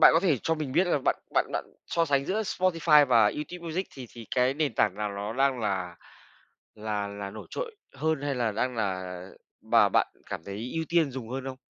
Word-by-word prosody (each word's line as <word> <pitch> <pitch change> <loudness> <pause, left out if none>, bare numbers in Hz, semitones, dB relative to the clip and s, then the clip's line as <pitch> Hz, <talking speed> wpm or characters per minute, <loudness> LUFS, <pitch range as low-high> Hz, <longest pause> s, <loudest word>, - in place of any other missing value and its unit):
bạn - - +10
có 165 - +5
thể 165 -9 +2
cho 165 - +1
mình 150 -4 -4
biết 180 +6 +3
là 175 - +2
bạn - - +3 0.2
bạn - - +3
bạn - - -1 0.2
so 170 - +1
sánh 140 -3 +1
giữa 210 +8 0
Spotify 165 -7 +4
và 120 -3 +5
YouTube 170 +10 -2
Music 180 +4 -2
thì 130 -3 -8
thì 115 -2 -10
cái 125 +1 +3
nền 145 -5 0
tảng 90 - +2
nào 105 0 -2
ló 100 +2 -4
đang 135 +1 +2
là 95 -5 -2 0.8
là 105 -1 -3
là 100 -1 -6
nổi 110 +1 -9
trội 470 -3 -5 0.2
hơn, 155 +1 0
hay 145 -1 -1
là 120 -3 0
đang 125 +4 -1
là 95 -4 -2 0.4
và - - +5
bạn - - +3 0.2
cảm 80 - -4
thấy 105 +5 -5
ưu 160 0 0
tiên 165 -4 +3
dùng 125 -3 -6
hơn 130 +1 -4
không? 130 -1 -5
130 Hz, 225 wpm, -28 LUFS, 105-160 Hz, 0.8 s, bạn